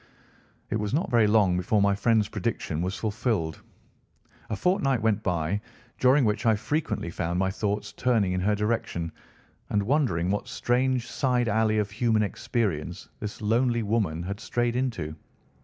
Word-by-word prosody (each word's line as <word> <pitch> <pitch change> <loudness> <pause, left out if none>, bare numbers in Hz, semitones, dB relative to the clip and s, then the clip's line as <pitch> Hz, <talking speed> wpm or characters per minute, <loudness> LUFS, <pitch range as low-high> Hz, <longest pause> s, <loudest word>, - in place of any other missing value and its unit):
It - - +1
was 105 +4 -1
not 160 - -1
very 115 -3 +5
long 105 -4 +4
before 95 +4 +1
my 100 0 +4
friend's 110 0 +2
prediction 75 - -2
was 90 +3 -2
fulfilled. 105 - -1 0.9
A 110 - -1
fortnight 135 - +1
went 110 -1 +2
by, 90 +1 -1 0.4
during 130 +1 +5
which 105 +3 0
I 110 - +5
frequently 120 - -2
found 85 0 -2
my 95 +1 +1
thoughts 105 0 -2
turning 110 -7 +1
in 90 - -1
her 105 +3 +2
direction 105 -6 -1 0.6
and 105 -1 +1
wondering 100 - +1
what 105 - -2
strange 125 0 0
side 125 -2 +1
alley 110 0 +2
of 105 -1 0
human 110 0 +2
experience 100 - -2
this 105 +1 -6
lonely 120 +2 +2
woman 100 -7 0
had 100 +3 -4
strayed 120 0 -1
into. 115 -13 -2
105 Hz, 155 wpm, -27 LUFS, 95-120 Hz, 0.9 s, very